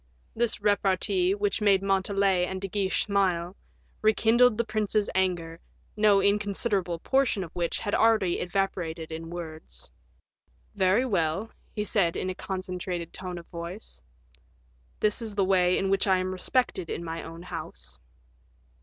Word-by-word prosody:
This 235 0 +1
repartee, 195 -2 +2
which 205 +1 -1
made 200 -2 +4
Montalais 195 -1 +2
and 190 0 -4
De 195 - -4
Guiche 195 -1 0
smile, 185 -3 0 0.5
rekindled 225 +2 +4
the 235 - +2
prince's 215 -1 0
anger, 175 -3 -1 0.4
no 210 -2 +5
inconsiderable 200 -3 0
portion 255 0 +1
of 165 - -9
which 170 -1 -1
had 205 - -3
already 215 -6 +3
evaporated 175 -4 -2
in 165 +1 -6
words. 160 - -8 0.8
"Very 190 +7 +3
well," 190 -1 0 0.2
he 210 - -1
said, 185 -6 +1
in 185 - -2
a - - -4
concentrated 185 -2 -4
tone 180 -1 -6
of 170 - -9
voice, 170 - -7 1.0
"this 210 +3 +1
is 220 -3 -5
the 195 -2 +2
way 180 -1 +3
in 195 0 0
which 195 +1 +2
I 190 -1 +4
am 185 0 -2
respected 185 -1 -1
in - - -4
my 165 0 -4
own 165 +1 -9
house." - - -8
190 Hz, 145 wpm, -27 LUFS, 175-205 Hz, 1.0 s, no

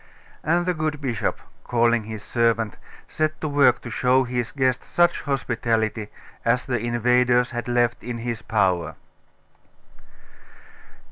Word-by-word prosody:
And 175 +2 +2
the 180 - +1
good 155 -2 -2
bishop, 125 -7 -2 0.2
calling 120 -2 +2
his 110 -1 -7
servant, 115 -2 +1 0.3
set 155 0 -1
to 155 - -3
work 140 -4 +4
to 120 - -7
show 130 +3 +3
his 125 -1 -3
guest 130 -3 0
such 175 0 +2
hospitality 115 -6 -1 0.4
as 120 +2 +1
the 125 -2 -1
invaders 120 +1 +2
had 120 -1 -4
left 120 -1 +1
in 120 +1 -4
his 115 -1 -4
power. 95 -7 0
120 Hz, 130 wpm, -23 LUFS, 115-130 Hz, 0.4 s, work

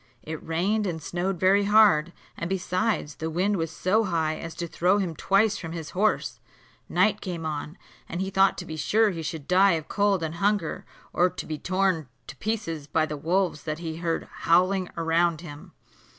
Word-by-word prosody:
It 160 0 -6
rained 195 +6 0
and 165 -3 -3
snowed 180 +3 -3
very 195 +3 +4
hard, 200 -6 +5 0.2
and 170 - -4
besides, 185 -2 -1
the 160 - -3
wind 190 +5 +1
was 165 -1 -2
so 190 +7 +1
high 160 -4 0
as 165 0 -7
to 170 - -3
throw 180 +4 +2
him 180 -5 -2
twice 200 +5 +2
from 165 0 -6
his 160 -3 -6
horse. 210 +3 0 0.5
Night 205 +3 +2
came 175 -4 -5
on, 155 +2 -4 0.3
and 170 - -4
he 190 +1 -2
thought 195 0 +3
to 180 - -6
be 160 -2 -6
sure 215 +6 +3
he 165 -3 -5
should 160 -2 -5
die 190 +1 +5
of 160 -2 -3
cold 200 -4 +1
and 160 -1 -3
hunger, 200 -5 0 0.3
or 180 +1 +3
be 155 -3 -6
torn 185 -5 0 0.2
to - - -9
pieces 165 - -3
by 155 - +1
the 150 -1 -5
wolves 170 +1 0
that 155 -1 -2
he 160 -1 -5
heard 165 -1 -2
howling 185 +2 +2
round 165 0 +1
him. 145 -4 -10
175 Hz, 190 wpm, -26 LUFS, 160-195 Hz, 0.5 s, hard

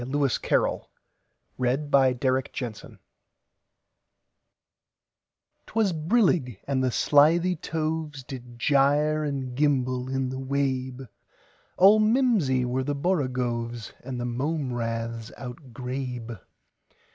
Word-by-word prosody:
Lewis 135 0 0
Carroll - - 0 0.7
1832–98 135 +1 +3
Jabberwocky 130 +1 0
CarrollL 120 -5 -6 2.7
'T - - -15
WAS 215 -5 +2
brillig, 160 - +1
and 135 -2 0
the 130 - +2
slithy 165 +8 +4
tovesDid 150 -7 -4
gyre 145 +3 +3
and 135 -4 -3
gimble 130 -3 +1
in 135 -1 -1
the 130 +1 -5
wabe; 130 -1 -2 0.7
All 200 +4 +7
mimsy 215 - +3
were 130 +2 -1
the 145 +2 -2
borogoves, 125 - -2
And 125 -1 -5
the 120 - -2
mome 135 +2 -2
raths 115 -1 -3
outgrabe. 125 - -6
130 Hz, 100 wpm, -26 LUFS, 125-150 Hz, 2.7 s, All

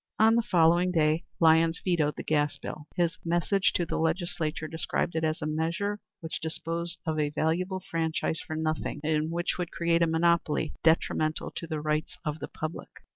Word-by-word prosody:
On 220 +1 +6
the 235 - +4
following 175 -4 +4
day 155 -1 +2
Lyons 165 0 +5
vetoed 160 -5 +1
the - - -6
gas 145 -2 +1
bill. 150 +2 -7
His 170 -2 0
message 175 +3 +2
to 175 - +1
the - - -2
Legislature 160 -1 -1
described 160 +2 -1
it 160 - 0
as 155 0 0
a - - -1
measure 165 +7 -1 0.2
which 160 -1 -5
disposed 165 +2 -3
of 160 -2 -1
a 150 -1 +1
valuable 175 +5 -1
franchise 160 -1 -1
for 155 - -6
nothing, 155 -2 -2
and 155 0 +1
which 175 +2 -1
would 175 -2 -2
create 170 0 +1
a 170 - +4
monopoly 160 -1 +2
detrimental 160 -1 +2
to 165 - -5
the 155 -2 -3
rights 155 +3 -1
of 150 0 -2
the - - -5
public. 155 +2 -6
160 Hz, 180 wpm, -28 LUFS, 155-170 Hz, 0.2 s, On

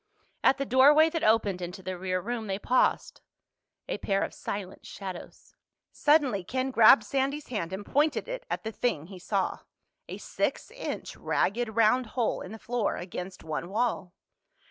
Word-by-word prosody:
At 270 - +5
the 275 - -2
doorway 290 +5 +6
that 330 -1 -2
opened 215 -4 +2
into 180 +2 -6
the 185 0 -4
rear 185 0 -2
room 225 +3 -4
they 195 -1 -1
paused, 250 +5 +1 0.7
a - - -3
pair 195 0 0
of - - -4
silent 195 -2 -6
shadows. 190 -3 -9 0.4
Suddenly 285 - +2
Ken 260 +7 -2
grabbed 225 -2 +7
Sandy's 275 +5 -2
hand 205 -8 -3
and 195 +2 -5
pointed 300 +2 +1
it - - -5
at - - -3
the 220 - -4
thing 205 -10 -1
he 185 +1 -11
saw—a 195 +2 -5
six - - -3
inch - - -6
ragged 220 +1 -1
round 230 +2 +3
hole 235 - 0
in 185 - -8
the 220 - -7
floor 235 -1 -1
against 180 +1 -7
one 155 +1 -4
wall. 205 -4 -1
220 Hz, 165 wpm, -28 LUFS, 190-255 Hz, 0.7 s, grabbed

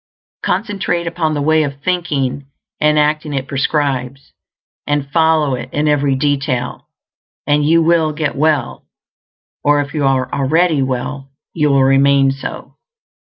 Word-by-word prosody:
Concentrate 195 -3 -1
upon 165 -2 -1
the 145 - -1
way 160 +1 +3
of 140 -2 -3
thinking 145 -6 -2 0.3
and 150 0 +3
acting 150 0 0
it 135 0 -3
prescribes, 140 -2 -2 0.5
and 145 -1 -1
follow 160 -3 +2
it 125 0 -5
in 150 +1 0
every 145 -2 +2
detail, 135 -3 -2 0.6
and 145 +1 +2
you 165 +2 +3
will 165 -1 +2
get 150 -1 -3
well; 150 -3 0 0.8
or 145 0 +3
if 145 0 -3
you 150 -2 -1
are 135 -2 0
already 155 +2 +2
well, 135 +1 -3 0.2
you 150 -3 +1
will 135 -1 +3
remain 135 0 +4
so. 135 +1 -8
145 Hz, 140 wpm, -16 LUFS, 135-155 Hz, 0.8 s, remain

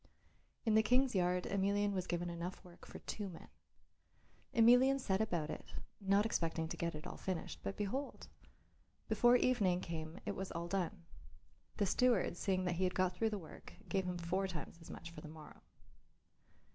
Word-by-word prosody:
In 220 - +3
the 220 - +7
King's 250 +4 +3
yard 180 -1 +2
Emelian 200 +1 +1
was 185 -2 -2
given 175 0 -1
enough 170 +3 -5
work 175 -1 -14
for - - -8
two 205 -2 -5
men. 170 - -11 1.0
Emelian 250 +4 +6
set 195 -5 +1
about 170 -8 -1
it, - - -8 0.2
not 200 +1 +3
expecting 165 -6 0
to - - -3
get 170 -2 -2
it 150 - -8
all - - -6
finished, 185 -3 -4
but 195 - -4
behold! 250 +8 -3 0.8
before 240 +3 +5
evening 210 -8 +3
came 165 +1 -5
it 205 - -2
was 190 0 -4
all 170 0 -3
done. 180 -1 -2 0.7
The 205 - +2
steward, 235 -2 +3
seeing 185 0 0
that 175 -1 0
he 190 - 0
had 180 0 +1
got 185 -1 +2
through 225 - +1
the 210 - -2
work, 165 -5 -11 0.2
gave 190 +1 +1
him 180 -1 -2
four 180 +3 0
times 170 -2 -6
as 165 - -12
much 170 - -8
for 155 - -9
the - - -9
morrow. 155 -1 -12
185 Hz, 185 wpm, -37 LUFS, 170-210 Hz, 1.0 s, the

